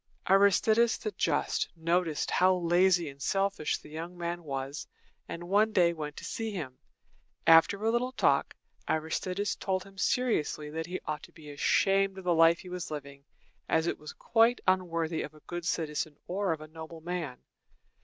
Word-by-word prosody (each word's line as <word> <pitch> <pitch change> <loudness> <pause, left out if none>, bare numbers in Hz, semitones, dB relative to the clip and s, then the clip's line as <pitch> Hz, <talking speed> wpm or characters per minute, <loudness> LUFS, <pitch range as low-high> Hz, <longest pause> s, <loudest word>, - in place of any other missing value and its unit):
Aristides 200 +4 +4
the 430 - -4
Just - - 0
noticed 165 -1 0
how 185 0 +4
lazy 175 0 +3
and 140 0 -10
selfish 195 -2 0
the - - -15
young 165 +3 -7
man 175 0 -4
was, 135 0 -5 0.4
and 170 - -6
one 210 +4 +3
day 175 -5 +4
went 150 -2 -6
to - - -7
see 225 -1 -3
him. 150 -11 -6 0.7
After 165 +5 +6
a 225 - +3
little 245 +2 0
talk, - - +2 0.3
Aristides 180 +5 -1
told 190 -1 -2
him 195 -1 -15
seriously 155 -13 0
that 160 +1 -4
he 185 +1 -4
ought 155 -1 -3
to - - -13
be 150 -2 -12
ashamed 195 +6 +2
of 190 - -8
the 180 -1 +2
life 165 0 +5
he 180 - -10
was 180 -1 -5
living, 140 -2 -8 0.4
as 160 0 +2
it - - -2
was 150 - -8
quite 230 +2 +3
unworthy 165 -3 +1
of 150 - -7
a - - -15
good 175 -1 -5
citizen 155 -2 -2
or 190 +1 -1
of 160 -1 -3
a 155 - -9
noble 160 +1 -10
man. 170 -6 -4
175 Hz, 175 wpm, -30 LUFS, 155-195 Hz, 0.7 s, After